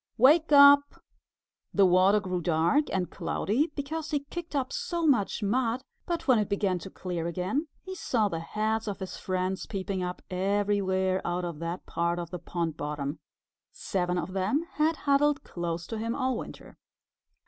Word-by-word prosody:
Wake 305 +7 +5
up!" 285 0 +7 0.8
The 200 - +6
water 185 +3 +5
grew 185 -3 -3
dark 170 - +2
and 185 -2 -1
cloudy 250 - 0
because 305 +2 -4
he 290 -2 0
kicked 345 -3 -6
up 265 -1 -1
so 340 -1 -2
much 235 -7 +2
mud, 240 +4 0 0.2
but 340 -3 -3
when 255 -4 +5
it 210 - -1
began 195 -3 0
to 190 - -8
clear 175 -3 -4
again 185 - -2 0.2
he 375 - -6
saw 235 - 0
the 165 -5 -3
heads 215 +6 -2
of 205 - -3
his 190 -1 -6
friends 185 +1 -2
peeping 195 -1 -3
up 180 0 -4
everywhere 190 -1 +1
out 175 +1 -2
of 170 -3 -5
that 170 +2 -4
part 170 +1 -1
of 170 -1 -5
the 180 - -5
pond 170 -2 -3
bottom. 145 0 -4 0.5
Seven 180 -2 -2
of 175 +2 -3
them 195 - 0
had 315 +2 +1
huddled 285 +1 +3
close 170 -1 -4
to 225 - -5
him 230 +1 -2
all 260 -2 0
winter. - - -9
200 Hz, 170 wpm, -28 LUFS, 180-270 Hz, 0.8 s, up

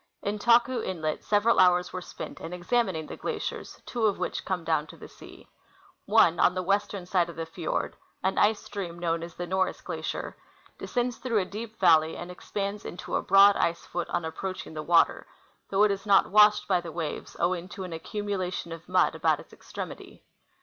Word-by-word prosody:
In 205 +1 -2
Taku 240 +3 +4
inlet 155 -4 -3
several 215 +2 +3
hours 180 -1 +4
^were 185 - -5
spent - - -8
in 165 - -6
examining 180 -3 0
the - - -8
glaciers, - - -5
two 230 -3 0
of 200 - 0
which - - -3
come 185 -3 -2
down 160 -2 0
to - - -13
the - - -11
sea. - - -15 0.6
One 195 -6 +5
on 180 - +4
the 185 - -1
western 200 0 -1
side 180 -2 +1
of 170 - -9
the 165 - -4
fjord, 165 0 -3 0.3
an 190 +1 +1
ice 215 0 +4
stream 185 -5 -6
known 165 -1 -1
as 170 0 -8
the 175 - -4
Norris 185 +1 0
glacier, - - -5 0.4
descends 245 -1 -2
through 245 -4 -1
a 195 - +2
deep 220 +3 -8
valley 160 -3 +4
and 175 +1 -7
expands 200 +3 -4
into 175 - -5
a - - +1
broad 195 +1 +6
ice 170 0 0
foot 175 -1 -4
on 170 - -1
approaching 175 +1 -5
the 155 - -4
water, 165 +2 +3 0.4
though 200 +1 +3
it 210 - +4
is 200 +1 -4
not 195 -2 +4
washed 210 0 +6
by 180 -3 +2
the 170 -1 -7
waves, 160 -2 -5
owing 180 0 0
to 190 - -7
an 180 -2 -6
accumulation 185 0 -4
of 165 +1 -9
mud 185 - +3
about - - +1
its - - -14
extremity. - - -9
185 Hz, 200 wpm, -27 LUFS, 170-205 Hz, 0.6 s, broad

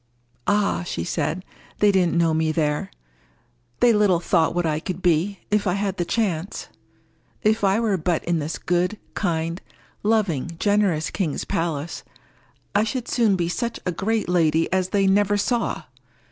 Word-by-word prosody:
"Ah!" 205 -1 +2
she 175 - -4
said, 170 +1 -2 0.3
"they 210 -1 +4
didn't 180 -3 +2
know 165 -1 +3
me 160 0 +1
there. 150 - 0 0.9
They 240 -1 +6
little 205 -5 +3
thought 170 -1 +1
what 175 -1 +1
I 155 -1 0
could 185 +2 -5
be, 180 +4 +1
if 210 -1 +2
I 180 - +2
had 195 0 -1
the 175 - -1
chance. 190 -3 -2 0.7
If 215 0 +2
I 195 +2 +3
were 215 -4 +1
but 170 0 0
in 170 -1 0
this 155 +2 -3
good, 180 +4 0 0.2
kind, 165 -2 -1 0.4
loving, 185 -8 0
generous 200 -7 +2
king's 170 -8 -2
palace, 165 -1 -2 0.7
I 205 - +3
should 235 +2 -3
soon 225 -5 +2
be 175 -2 0
such 235 +6 -3
a 180 - 0
great 215 +5 -1
lady 165 -2 +2
as 185 -1 +1
they 200 -1 +2
never 205 +1 +3
saw! 230 -5 -1
180 Hz, 160 wpm, -23 LUFS, 165-205 Hz, 0.9 s, They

